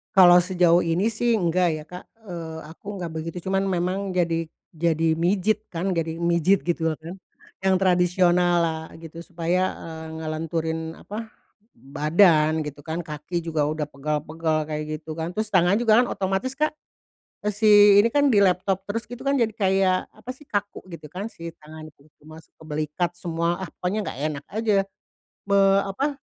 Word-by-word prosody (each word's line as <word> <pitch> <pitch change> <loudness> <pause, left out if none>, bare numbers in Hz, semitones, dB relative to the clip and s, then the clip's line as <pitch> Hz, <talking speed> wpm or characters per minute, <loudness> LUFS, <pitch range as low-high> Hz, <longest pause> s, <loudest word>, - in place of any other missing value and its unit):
Kalau 180 -2 +8
sejauh 175 -1 +3
ini 175 +7 +1
sih 235 +1 0
enggak 180 -3 +2
ya 155 -1 -5
Kak, 180 0 -9 0.2
eee, 165 -2 -6
aku 165 - -16
enggak 175 -4 -5
begitu 165 +2 -5
cuman 195 0 +1
memang 185 +1 -1
jadi 165 -2 0 0.2
jadi 160 -1 0
mijit 200 +5 +1
kan 175 +3 -2
jadi 165 -2 -2
mijit 170 +3 +3
gitu 165 -2 -1
lah - - -10
kan, 170 +4 -8 0.5
yang 190 - +4
tradisional 180 -1 +3
lah 160 -1 -1 0.2
gitu 165 +1 -10
supaya, 175 +2 -1
eee, 160 -1 -9
ngelenturin 160 +1 -3
apa, 220 +2 -7 0.4
badan 155 +2 +3
gitu 145 -1 -8
kan 160 +3 -5
kaki 155 +3 -5
juga 155 -3 0
udah 155 0 -2
pegal-pegal 150 +2 -2
kayak 150 0 -4
gitu 155 +1 -9
kan 160 +1 -4
terus 215 0 -2
tangan 180 +1 +4
juga 225 0 +4
kan 250 - 0
otomatis 195 +8 -2
Kak, 305 +1 +1 0.8
si 205 -1 +6
ini 215 - +5
kan 285 +3 +2
di 205 - +4
laptop 190 0 +2
terus 230 +3 -3
gitu 245 +3 -7
kan 280 - +3
jadi 230 -4 +1
kayak 190 -3 +1
apa 255 - -8
sih 275 +3 -15
kaku 205 -2 -4
gitu 165 -4 -10
kan 195 +5 -5
si 170 -6 -9
tangan 155 +1 -11
itu - - -30 0.2
masuk 155 +1 -14
ke - - -17
belikat 155 +3 -2
semua, 170 +1 -1
ah, 190 - -5
pokoknya 200 +3 -2
enggak - - -6
enak 145 -1 -8
aja, 205 -3 +1 0.6
be 200 0 +2 0.2
apa, 270 +10 -2
175 Hz, 170 wpm, -24 LUFS, 160-195 Hz, 0.8 s, Kalau